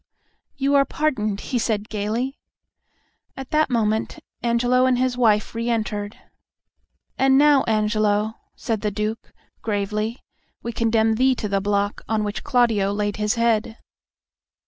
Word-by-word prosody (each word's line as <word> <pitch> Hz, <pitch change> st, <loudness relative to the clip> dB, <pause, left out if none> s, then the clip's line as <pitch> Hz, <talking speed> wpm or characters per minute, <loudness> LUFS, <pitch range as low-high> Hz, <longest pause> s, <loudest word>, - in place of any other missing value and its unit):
"You 275 Hz, +1 st, 0 dB
are 280 Hz, -1 st, +6 dB
pardoned," 215 Hz, -10 st, -1 dB
he 250 Hz, -, -2 dB
said, 215 Hz, -2 st, -1 dB
gaily. 220 Hz, +6 st, -3 dB, 1.0 s
At 270 Hz, -1 st, -8 dB
that 310 Hz, -1 st, +2 dB
moment 220 Hz, -3 st, 0 dB, 0.2 s
Angelo 245 Hz, +2 st, +2 dB
and 255 Hz, -1 st, +2 dB
his 255 Hz, 0 st, 0 dB
wife 220 Hz, -4 st, +2 dB
re 230 Hz, +1 st, -2 dB
entered. 210 Hz, -2 st, -2 dB, 1.0 s
"And 270 Hz, 0 st, +4 dB
now, 290 Hz, -1 st, +5 dB
Angelo," 215 Hz, -1 st, +1 dB, 0.2 s
said 225 Hz, -4 st, -3 dB
the 210 Hz, -, 0 dB
Duke, 210 Hz, +2 st, -4 dB, 0.3 s
gravely, 210 Hz, +2 st, -2 dB, 0.5 s
"we 235 Hz, -, -3 dB
condemn 225 Hz, -1 st, +2 dB
thee 260 Hz, +1 st, +3 dB
to 215 Hz, -, -3 dB
the 195 Hz, -1 st, 0 dB
block 205 Hz, 0 st, -1 dB
on 220 Hz, -1 st, +1 dB
which 205 Hz, 0 st, -4 dB
Claudio 230 Hz, -7 st, +2 dB
laid 205 Hz, 0 st, -2 dB
his 210 Hz, +2 st, 0 dB
head!" 230 Hz, -1 st, +1 dB
220 Hz, 140 wpm, -22 LUFS, 210-245 Hz, 1.0 s, are